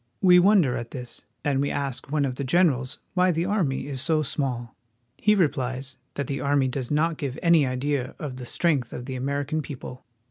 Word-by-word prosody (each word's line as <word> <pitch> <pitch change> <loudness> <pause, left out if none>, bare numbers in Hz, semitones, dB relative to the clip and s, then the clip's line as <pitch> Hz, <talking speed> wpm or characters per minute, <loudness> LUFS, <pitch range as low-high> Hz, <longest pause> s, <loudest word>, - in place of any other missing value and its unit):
We 180 -2 +7
wonder 180 -9 +4
at 120 0 -5
this, 125 -5 -8 0.2
and 140 -2 +2
we 140 - 0
ask 140 -1 -3
one 150 -2 +2
of 130 - -2
the 140 - -4
generals 135 -3 +2 0.2
why 185 -1 +3
the 170 0 +1
army 185 -9 0
is 135 -2 -2
so 155 0 +2
small. 125 -5 -3 0.4
He 210 0 +4
replies 135 -6 -1 0.2
that 140 - -2
the 140 +2 -3
army 140 -1 +2
does 130 -1 -3
not 155 +2 +1
give 135 -3 -3
any 165 -5 +5
idea 130 +1 -2
of 140 -5 -6
the 125 -1 -7
strength 145 -8 0
of 125 - -6
the 135 - -5
American 140 +4 -1
people. 130 -3 -8
140 Hz, 200 wpm, -25 LUFS, 130-155 Hz, 0.4 s, We